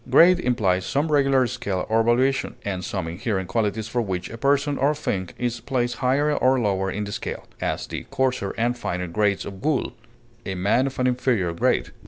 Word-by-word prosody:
Grade 175 +7 +7
implies 100 - +1
some 145 +9 0
regular 135 -3 +4
scale 120 -7 -3
of 110 0 +2
valuation, 130 +3 +2
and 95 -3 -3
some 95 -2 -3
inherent 95 +2 -2
qualities 105 +2 -1
for 120 +1 -1
which 95 -4 -3
a 115 - -7
person 140 +2 +2
or 140 +3 +2
thing 95 - -2
is 120 -1 -2
placed 125 -2 -1
higher 140 +5 +2
or 130 -1 +3
lower 95 -4 0
in 105 +2 -3
the 100 - -5
scale; - - -5 0.2
as, - - -1
the - - -5
coarser 125 -6 0
and 120 +2 +1
finer 90 -7 -3
grades 100 +2 0
of 95 0 -8
wool; 150 -4 0 0.5
a 95 - -4
man 105 +8 +2
of 135 - -6
an 125 - +1
inferior 125 -8 +1
grade. 85 - +1
120 Hz, 195 wpm, -24 LUFS, 95-130 Hz, 0.5 s, Grade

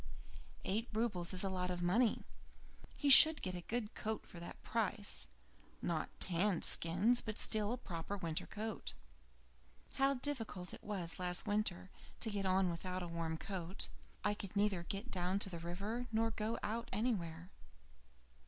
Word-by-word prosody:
Eight 220 +5 -1
roubles 210 -6 -1
is 185 0 -3
a 195 - 0
lot 180 -1 -1
of 175 -1 -2
money 215 +6 +2 0.7
he 290 - -1
should 315 +3 +11
get 185 - -2
a 175 - -5
good 220 +4 -3
coat 220 0 -3
at 170 - -8
that 170 - -8
price. 215 -2 +1 0.5
Not - - -2
tanned 180 0 +2
skins, 195 +9 +4
but 215 -2 -5
still 215 0 +1
a 245 - -1
proper 185 -2 -5
winter 165 -4 -3
coat. 210 - -5 1.0
How 275 +1 +4
difficult 235 -9 -3
it - - -10
was 185 -6 -4
last 180 -1 -1
winter 205 -3 -1 0.3
to 220 - +2
get 200 -2 -1
on 185 -1 +3
without 180 +2 -4
a - - -5
warm 165 -1 -3
coat. 185 0 -5 0.3
I 210 - +2
could 200 -1 -7
neither 200 -3 +2
get 195 +8 -5
down 180 +1 0
to 200 -1 0
the 170 - -5
river, 200 +9 -4
nor 225 +1 +1
go 220 +1 -2
out 230 +3 -3
anywhere. 185 -6 -2
195 Hz, 160 wpm, -37 LUFS, 175-220 Hz, 1.0 s, should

